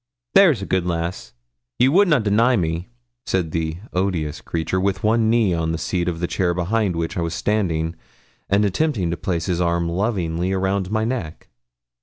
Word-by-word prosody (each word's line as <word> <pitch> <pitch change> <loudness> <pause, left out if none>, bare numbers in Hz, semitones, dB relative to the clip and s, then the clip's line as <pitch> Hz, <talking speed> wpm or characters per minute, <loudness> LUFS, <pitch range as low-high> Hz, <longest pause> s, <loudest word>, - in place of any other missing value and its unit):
'There's 170 - +5
a - - -4
good 95 -2 0
lass, 85 -6 -3 0.4
ye 125 - +4
would 190 +9 +5
na 150 -4 +4
deny 115 +3 +3
me,' 85 -2 -1 0.4
said 90 -4 0
the 80 0 -2 0.2
odious 90 -5 -1
creature, 85 +3 -2
with 95 -1 -1
one 110 +1 +3
knee 110 -5 +3
on 80 -1 -1
the 80 - -1
seat 85 +2 -2
of 85 -2 -2
the 90 - 0
chair 85 0 0
behind 95 +1 0
which 85 +1 -3
I - - 0
was 85 0 -2
standing, 85 -6 0 0.5
and 100 +2 +3
attempting 100 - 0
to - - -1
place 85 -4 -2
his 90 -1 -1
arm 85 0 +1
lovingly 90 -1 -1
round 95 0 0
my 110 +1 0
neck. 110 -10 -4
90 Hz, 185 wpm, -21 LUFS, 85-105 Hz, 0.5 s, There's